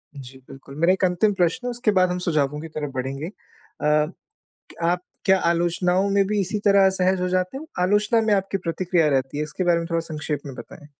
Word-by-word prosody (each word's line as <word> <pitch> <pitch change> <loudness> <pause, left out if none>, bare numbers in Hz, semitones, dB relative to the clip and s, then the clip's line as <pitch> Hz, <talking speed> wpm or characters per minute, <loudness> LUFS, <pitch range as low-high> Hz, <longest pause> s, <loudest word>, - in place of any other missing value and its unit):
जी 130 -1 -10
बिल्कुल 135 +1 -12
मेरा 170 +3 +4
एक 190 - -3
अंतिम 185 +4 +2
प्रश्न 185 +8 0
है 245 - -1
उसके 240 -2 0
बाद 185 -2 +3
हम 180 - -2
सुझावों 150 -3 0
की 165 - -7
तरफ 145 -2 -3
बढ़ेंगे। 135 +4 -3
अ, - - -8 0.5
क 150 - 0 0.5
आप 175 +1 +1 0.2
क्या 190 -1 +4
आलोचनाओं 180 +3 +1
में 200 0 +3
भी 210 +1 0
इसी 200 +3 -2
तरह 200 -1 +5
असहज 190 -1 +1
हो 180 - 0
जाते 185 +5 -1
हो? 315 - -9
आलोचना 210 +5 +3
में 215 - +3
आपकी 195 0 -1
प्रतिक्रिया 170 -1 +1
रहती 135 0 -1
है 150 - 0
इसके 155 +5 -4
बारे 175 -1 +3
में 165 - -4
थोड़ा 165 0 +1
संक्षेप 150 -3 -4
में 135 - -7
बताएँ? 145 +3 -11
180 Hz, 220 wpm, -23 LUFS, 150-195 Hz, 0.5 s, तरह